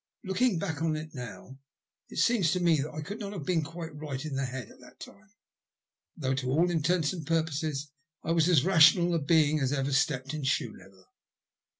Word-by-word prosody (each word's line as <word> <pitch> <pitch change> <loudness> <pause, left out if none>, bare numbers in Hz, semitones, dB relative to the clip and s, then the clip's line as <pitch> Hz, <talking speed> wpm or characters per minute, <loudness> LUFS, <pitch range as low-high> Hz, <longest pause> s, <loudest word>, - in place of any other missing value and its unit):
Looking 195 +2 +1
back 160 -4 -3
on 160 -1 +1
it 155 +1 -7
now 130 +1 -9 0.5
it - - -10
seems 210 -10 +3
to 180 - 0
me 170 -4 +3
that 150 - -5
I 155 - -6
could 205 +8 -7
not 205 -2 -5
have 175 -8 -6
been 170 -1 +1
quite 165 0 -8
right 145 -2 -6
in 150 -3 -4
my 135 0 -1
head 125 -2 -6
at - - -18
that - - -17
time, 210 +1 -13 0.9
though 135 -4 -1
to 130 -1 -2
all 165 +6 +2
intents 165 0 +1
and 170 -4 -6
purposes 155 -2 -2 0.3
I 165 - -2
was 165 0 +3
as 160 -5 +4
rational 175 -1 +6
a 165 - +2
being 155 0 +3
as 135 -2 0
ever 140 -1 -1
stepped 135 0 0
in 155 - -4
shoe 130 -4 -1
leather. 95 -1 -17
155 Hz, 210 wpm, -29 LUFS, 135-170 Hz, 0.9 s, rational